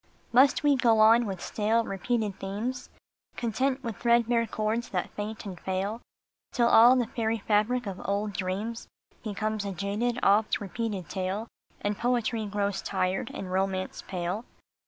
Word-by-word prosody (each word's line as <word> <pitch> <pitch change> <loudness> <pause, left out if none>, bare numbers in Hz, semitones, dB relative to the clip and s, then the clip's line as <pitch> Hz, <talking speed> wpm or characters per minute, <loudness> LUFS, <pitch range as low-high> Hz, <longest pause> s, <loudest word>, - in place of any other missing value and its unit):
Must 265 +5 +5
we 290 -1 +5
go 235 -4 +3
on 225 +2 +6
with 190 -3 -5
stale, 225 +2 +1
repeated 210 0 -2
themes, 230 +7 -4 0.5
Content 255 +4 -1
with 230 -4 -4
threadbare 235 -1 +3
chords 220 +3 -2
that 180 -2 -2
faint 215 +1 -6
and 185 -4 -7
fail, 195 +5 -2 0.5
Till 240 -1 +3
all 235 +2 +7
the 250 -2 +2
fairy 225 0 -1
fabric 225 +4 +2
of 195 -2 -5
old 205 +1 -1
dreams 200 +5 -3 0.4
Becomes 215 -1 -2
a 200 -1 -3
jaded, 210 +6 -1
oft 210 +2 +3
repeated 205 -3 -4
tale, 190 +5 -3 0.3
And 205 0 -1
poetry 235 -2 0
grows 200 -2 -1
tired, 185 -1 -1
and 185 -2 -6
romance 190 0 -1
pale 185 +3 -3
215 Hz, 150 wpm, -28 LUFS, 195-235 Hz, 0.5 s, all